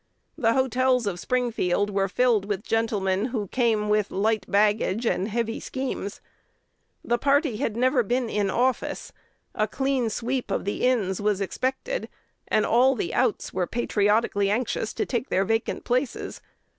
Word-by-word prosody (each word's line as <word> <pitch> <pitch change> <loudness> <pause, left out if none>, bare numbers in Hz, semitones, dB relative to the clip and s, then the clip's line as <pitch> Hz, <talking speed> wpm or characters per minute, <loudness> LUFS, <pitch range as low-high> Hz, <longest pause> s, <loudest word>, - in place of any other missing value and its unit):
The 230 -1 +2
hotels 255 -1 +2
of 185 -4 -2
Springfield 215 -5 0
were 195 -1 +1
filled 225 -1 +2
with 205 -1 -3
gentlemen 210 -4 0
who 230 -5 -3
came 225 -4 +1
with, 210 -1 +2
light 215 +2 0
baggage 210 +2 +2
and 195 -3 +1
heavy 225 +1 -2
schemes. 260 -6 -4 0.8
The 240 0 +1
party 280 -4 +2
had 220 0 -2
never 255 +1 +3
been 245 +3 0
in 205 -2 0
office: 250 +5 -1 0.4
a 215 -1 0
"clean 265 0 0
sweep" 245 +2 -2
of 195 - -1
the 205 +5 0
"ins" 205 -7 0
was 205 -1 +1
expected; 265 - -2 0.4
and 215 - +2
all 255 +3 +4
the 170 -7 -3
"outs" - - 0
were 180 -1 -1
patriotically 205 -3 +1
anxious 230 +4 -1
to 425 - -1
take 250 - -2
the 195 - +2
vacant 225 +3 -1
places. 250 +1 -2
225 Hz, 155 wpm, -25 LUFS, 205-250 Hz, 0.8 s, all